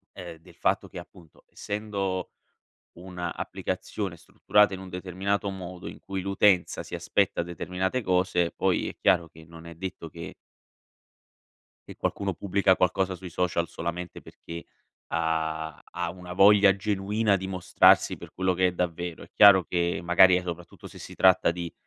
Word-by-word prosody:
ehm, 85 -2 -9
del 80 - -18
fatto - - 0
che, - - -9
appunto, 85 -4 -15
essendo 100 -3 -4 0.7
un'applicazione 90 +1 -5
strutturata 100 +4 +2
in 95 - -7
un 95 - -9
determinato 95 +2 -2
modo, 90 -2 -8
in - - -10
cui 95 -1 -5
l'utenza 100 -1 +2
si - - -9
aspetta - - 0
determinate 90 +6 -3
cose, 90 -3 +1
poi - - 0
è - - -9
chiaro 85 -2 +2
che 80 0 -16
non 80 +1 -13
è 85 - -9
detto 85 -1 -7
che 85 +1 -9 1.5
Che - - -10
qualcuno 100 -2 -2
pubblica 95 +1 +2
qualcosa 95 +1 +1
sui 90 0 -9
social 85 -1 -1
solamente 85 +1 -6
perché 85 0 -10 0.5
ha 80 -1 -2
ha 90 -1 -5
una 90 0 -9
voglia 100 0 +6
genuina 105 +1 0
di 95 0 -5
mostrarsi 90 -1 +3
per - - -12
quello 95 0 0
che 90 +1 +2
è - - -3
davvero. 85 -1 -4
È - - -20
chiaro 100 -3 +7
che 85 0 -1
magari 90 +2 +6
e 90 - -1
soprattutto 85 -1 -8
se - - -12
si - - -10
tratta 95 -2 +4
di 85 -1 -5
90 Hz, 155 wpm, -26 LUFS, 85-95 Hz, 1.5 s, chiaro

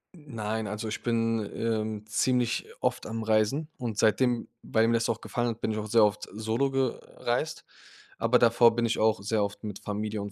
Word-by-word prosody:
Nein, 110 -8 -4
also 105 +2 -4
ich - - -4
bin, 115 -1 +1 0.2
ähm, 110 -2 -2
ziemlich 120 +2 +1
oft - - -1
am 115 0 -4
Reisen 110 +8 +1
und 115 -4 -4
seitdem 120 +3 +2
weil 110 0 +2
mir 115 - +2
das 115 0 +1
auch - - -1
gefallen 120 0 -2
hat, 115 - -5
bin 110 - 0
ich 110 - -2
auch 105 - -4
sehr 110 +1 +5
oft 105 0 -2
solo 110 +6 0
gereist, 135 -2 -2 0.5
aber 115 +2 +3
davor 115 0 +5
bin 120 0 +1
ich 115 - 0
auch 110 -2 +2
sehr 105 +1 +1
oft 100 +2 -5
mit 105 -2 -5
Familie 105 0 -3
und 100 - -6
110 Hz, 200 wpm, -28 LUFS, 105-120 Hz, 0.5 s, sehr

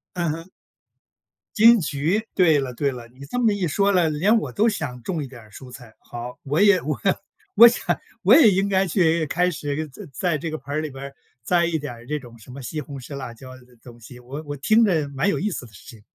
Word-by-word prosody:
嗯 170 -3 -1
哼。 165 +3 -6 1.1
金 230 0 +7
桔， 155 +7 0
对 165 -6 +4
了 130 -3 -3
对 140 +2 0
了， 120 -2 -9
你 130 +3 -13
这 245 - -4
么 225 -4 +3
一 190 -5 -1
说 200 +6 +2
了， 170 -4 +3
连 190 +10 +2
我 - - -5
都 225 +2 +2
想 145 - -4
种 165 -5 -3
一 - - -5
点 125 -2 -12
儿 110 -1 -18
蔬 125 +4 -12
菜。 125 -3 -13
好， 120 +1 -8
我 145 +6 -1
也 200 -3 +5
我 150 0 -3 0.6
我 235 +1 +10
想 235 - -1 0.3
我 210 +7 +6
也 275 -9 +7
应 195 +1 +1
该 190 0 +2
去 165 -2 +2
开 180 +4 +1
始 150 -2 -3
在 175 +10 -12
在 175 -1 -1
这 165 +2 -4
个 155 - -4
盆 140 +3 -8
儿 155 - 0
里 155 -2 -4
边 135 +1 -9
儿， 140 0 -9 0.3
栽 175 +2 +2
一 165 -2 0
点 145 -4 -6
儿 120 +1 -15
这 150 0 -1
种 120 -3 -14
什 115 - -15
么 135 +2 -9
西 150 +5 -5
红 140 -3 -8
柿、 135 +3 -9
辣 130 -4 -6
椒 130 +2 -12
的 125 -1 -20
东 120 -1 -14
西， 120 +2 -13
我 135 +5 -8
我 145 0 -6
听 220 - +3
着 160 -8 +1
蛮 140 +8 -1
有 - - -1
意 210 - -1
思 155 -9 -5
的 110 - -15
事 90 - -16
情。 110 -3 -15
150 Hz, 270 characters per minute, -23 LUFS, 130-180 Hz, 1.1 s, 我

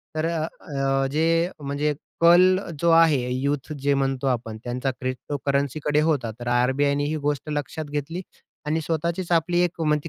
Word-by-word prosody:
तर 155 0 0
अ, 165 -1 -1 0.3
अ, 135 -1 +1
जे, 165 +3 +2
म्हणजे 145 +1 -1 0.3
कल 180 +2 +6 0.2
जो 170 - +2
आहे, 165 -3 +6
यूथ 140 +3 -2
जे 140 +1 +2
म्हणतो 135 -1 0
आपण, 115 -3 -2
त्यांचा 125 +2 -2
क्रिप्टोकरन्सी 140 +2 -2 0.2
होता. 145 -7 +1
तर 120 - -7
आर-बी-आयने 130 +4 +2
ही 155 +2 -1
गोष्ट 145 0 -1
लक्षात 150 +2 -3
घेतली 150 +5 -3 0.4
आणि 155 +2 0
स्वतःचीच 170 +3 -2
आपली 175 +1 +2
एक 175 -1 -1
म्हणजे 150 0 +1
145 Hz, 155 wpm, -24 LUFS, 135-165 Hz, 0.4 s, कल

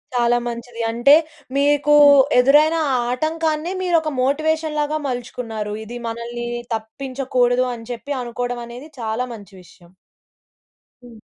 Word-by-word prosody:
చాలా 240 0 +3
మంచిది. 235 0 -6
అంటే 240 +5 +5 0.4
మీకూ 290 +1 +3 0.5
ఎదురైన 295 +5 +5 0.3
ఆటంకాన్ని 310 +4 -1
మీరొక 335 -4 +1
మోటివేషన్‌లాగా 310 +2 0
మలుచుకున్నారు. 230 -4 -5
ఇది 240 +3 -8
మనల్ని 235 +1 -5 0.3
తప్పించకూడదు, 250 +2 -1
అని 230 -1 -9
చెప్పి 240 +4 -7
అనుకోవడం 245 0 -4
అనేది 245 +5 -10
చాలా 225 +2 -2
మంచి 205 -3 -12
విషయం. 175 0 -20 1.1
హ్మ్. 235 -2 -14
245 Hz, 105 wpm, -20 LUFS, 235-295 Hz, 1.1 s, అంటే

